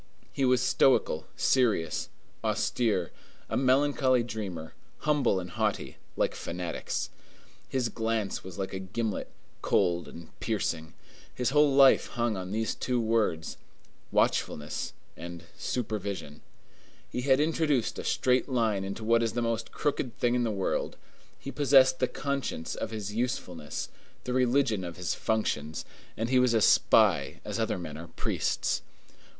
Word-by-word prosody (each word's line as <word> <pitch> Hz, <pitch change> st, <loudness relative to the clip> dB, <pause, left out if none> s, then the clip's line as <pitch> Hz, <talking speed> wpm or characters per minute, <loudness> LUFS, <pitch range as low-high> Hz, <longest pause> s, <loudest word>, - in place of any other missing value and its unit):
He 135 Hz, -, +1 dB
was 125 Hz, -1 st, +4 dB
stoical, 125 Hz, -, +3 dB
serious, 110 Hz, -, +2 dB, 0.3 s
austere; 105 Hz, -8 st, 0 dB, 0.4 s
a -, -, 0 dB
melancholy 130 Hz, -1 st, +3 dB
dreamer, 100 Hz, -8 st, -5 dB, 0.3 s
humble 145 Hz, -10 st, +2 dB
and 90 Hz, -1 st, -7 dB
haughty, -, -, -1 dB, 0.2 s
like -, -, +1 dB
fanatics. 90 Hz, 0 st, -4 dB, 0.6 s
His 130 Hz, -3 st, 0 dB
glance 110 Hz, -2 st, -2 dB
was 95 Hz, 0 st, -9 dB
like 95 Hz, -1 st, -3 dB
a 95 Hz, -, -3 dB
gimlet, 105 Hz, +3 st, -3 dB, 0.3 s
cold 85 Hz, -1 st, +2 dB
and 85 Hz, -1 st, -11 dB
piercing. 85 Hz, -7 st, -2 dB, 0.4 s
His 125 Hz, +1 st, 0 dB
whole 150 Hz, 0 st, +5 dB
life 135 Hz, -1 st, +6 dB
hung 120 Hz, -2 st, -1 dB
on 90 Hz, -1 st, -5 dB
these 110 Hz, +1 st, 0 dB
two 125 Hz, -1 st, -1 dB
words: 110 Hz, -8 st, 0 dB, 0.5 s
watchfulness 75 Hz, 0 st, 0 dB, 0.2 s
and 85 Hz, 0 st, -8 dB
supervision. 100 Hz, -, -4 dB, 0.7 s
He 125 Hz, -, -2 dB
had 135 Hz, +1 st, +4 dB
introduced 150 Hz, -5 st, +1 dB
a -, -, -4 dB
straight 125 Hz, +1 st, +2 dB
line 110 Hz, -6 st, +1 dB
into 100 Hz, +3 st, -5 dB
what 115 Hz, +1 st, +4 dB
is 115 Hz, -1 st, 0 dB
the 120 Hz, -, 0 dB
most 115 Hz, -1 st, -2 dB
crooked 130 Hz, -5 st, -2 dB
thing 120 Hz, 0 st, +2 dB
in 125 Hz, 0 st, +2 dB
the 115 Hz, -, +1 dB
world; 100 Hz, -3 st, -1 dB, 0.4 s
he 140 Hz, -, -6 dB
possessed 135 Hz, -2 st, +5 dB
the 130 Hz, -, +2 dB
conscience 140 Hz, -, -3 dB
of 110 Hz, -, -4 dB
his 105 Hz, -2 st, -5 dB
usefulness, 90 Hz, -, -3 dB, 0.4 s
the 125 Hz, -, -3 dB
religion 125 Hz, -5 st, +2 dB
of 85 Hz, -1 st, -6 dB
his 90 Hz, -1 st, -1 dB
functions, 80 Hz, -9 st, -1 dB, 0.3 s
and 115 Hz, +2 st, -1 dB
he 130 Hz, 0 st, +4 dB
was 125 Hz, -2 st, +3 dB
a 110 Hz, -, +3 dB
spy -, -, +4 dB
as -, -, -3 dB
other -, -, 0 dB
men 80 Hz, -4 st, -6 dB
are 85 Hz, +2 st, -8 dB
priests. 85 Hz, -, -1 dB
115 Hz, 145 wpm, -29 LUFS, 95-130 Hz, 0.7 s, life